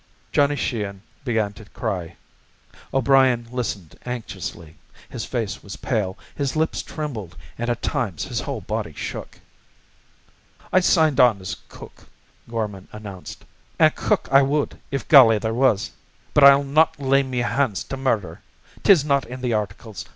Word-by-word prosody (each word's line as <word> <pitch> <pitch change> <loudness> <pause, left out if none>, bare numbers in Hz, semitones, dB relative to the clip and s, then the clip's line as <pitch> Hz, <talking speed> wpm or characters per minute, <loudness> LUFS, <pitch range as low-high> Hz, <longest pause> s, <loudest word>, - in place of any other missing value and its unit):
Johnny 145 0 +3
Sheehan 105 -7 -3 0.2
began 110 -5 0
to 110 - -12
cry. 90 -4 -4 0.8
O'Brien 130 -3 +3
listened 110 -9 -4
anxiously. 110 -9 -6 0.3
His - - -6
face 110 -5 -3
was 100 0 -8
pale. 105 -6 -2 0.2
His 140 -1 -2
lips 160 +1 0
trembled, 110 - -6 0.2
and 120 +1 -3
at 120 0 -2
times 115 - -1
his - - -3
whole - - -4
body - - -4
shook. - - -7 1.3
"I 185 - +7
signed 160 -6 +3
on 120 -5 +5
as 95 0 -5
cook," - - -13 0.4
Gorman 105 -5 -4
enounced. 100 -4 -9 0.3
"An' - - +5
cook - - 0
I 135 +1 +7
wud 145 +2 0
if 140 - -3
galley 120 -7 +8
there 110 +2 -2
was. 120 -4 +2 0.4
But 145 - +7
I'll 140 0 +8
not 155 +3 +2
lay 135 0 +3
me 130 -2 -4
hand 120 -1 +1
to 95 +8 -4
murder. 130 -7 -1 0.4
'Tis 170 -8 +5
not 140 -2 +1
in 125 +1 -8
the 125 -2 0
articles. 105 -1 -4
120 Hz, 150 wpm, -23 LUFS, 105-140 Hz, 1.3 s, galley